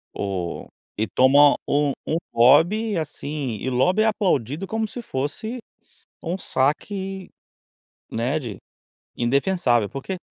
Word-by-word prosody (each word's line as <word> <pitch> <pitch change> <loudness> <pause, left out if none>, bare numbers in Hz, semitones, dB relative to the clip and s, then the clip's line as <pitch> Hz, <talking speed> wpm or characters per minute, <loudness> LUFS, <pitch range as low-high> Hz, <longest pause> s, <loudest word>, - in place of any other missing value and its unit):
O 95 -4 -4 0.3
e 110 - +1
toma 140 +6 +5
um 145 0 +2 0.2
um 160 - +1 0.2
lobby, 175 - +4
assim 145 -5 -4
e 130 - -2
o 130 - -3
lobby 180 +12 +3
é - - +2
aplaudido 190 - 0
como 220 0 -1
se 245 - -7
fosse 215 - -4 0.6
um 175 +3 -3
saque, 190 +7 -2 0.8
né, 125 +7 -1
de 115 -9 -7 0.6
indefensável, 120 - +1
por 135 -1 -7
quê 190 -1 -4
145 Hz, 130 wpm, -23 LUFS, 125-190 Hz, 0.8 s, toma